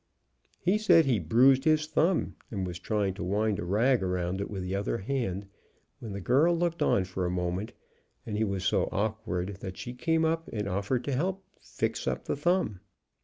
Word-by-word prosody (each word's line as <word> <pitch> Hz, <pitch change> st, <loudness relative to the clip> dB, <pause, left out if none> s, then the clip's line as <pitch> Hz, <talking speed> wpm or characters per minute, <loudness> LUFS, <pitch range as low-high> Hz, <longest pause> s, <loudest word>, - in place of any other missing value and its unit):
He 190 Hz, +4 st, +2 dB
said 175 Hz, -7 st, +5 dB
he 125 Hz, -6 st, +2 dB
bruised 130 Hz, -, +4 dB
his 155 Hz, 0 st, +3 dB
thumb 160 Hz, +3 st, +1 dB
and 95 Hz, -4 st, -3 dB
was 90 Hz, -1 st, -5 dB
trying 100 Hz, 0 st, 0 dB
to 95 Hz, -, -6 dB
wind 105 Hz, +2 st, 0 dB
a -, -, -3 dB
rag 115 Hz, +7 st, +3 dB
around 90 Hz, 0 st, -1 dB
it -, -, -4 dB
with 95 Hz, -3 st, -4 dB
the 90 Hz, +1 st, -3 dB
other 100 Hz, +3 st, -1 dB
hand, 100 Hz, -4 st, -2 dB, 0.5 s
when 115 Hz, -, -7 dB
the 100 Hz, -, -4 dB
girl 145 Hz, -, +3 dB
looked 170 Hz, 0 st, -1 dB
on 95 Hz, -, +3 dB
for 95 Hz, 0 st, -4 dB
a 90 Hz, -, 0 dB
moment, 90 Hz, +3 st, -2 dB, 0.5 s
and 105 Hz, -, -4 dB
he 110 Hz, -, +1 dB
was 100 Hz, -3 st, -2 dB
so -, -, +2 dB
awkward 100 Hz, -3 st, -2 dB
that 95 Hz, -1 st, -7 dB
she 120 Hz, -, -6 dB
came 160 Hz, +5 st, +1 dB
up 165 Hz, +1 st, 0 dB
and 105 Hz, -2 st, -3 dB
offered 100 Hz, +6 st, -1 dB
to 145 Hz, -, -3 dB
help 185 Hz, +8 st, -1 dB, 0.2 s
fix -, -, -3 dB
up -, -, -2 dB
the -, -, -1 dB
thumb. 150 Hz, -, +1 dB
110 Hz, 200 wpm, -29 LUFS, 95-150 Hz, 0.5 s, said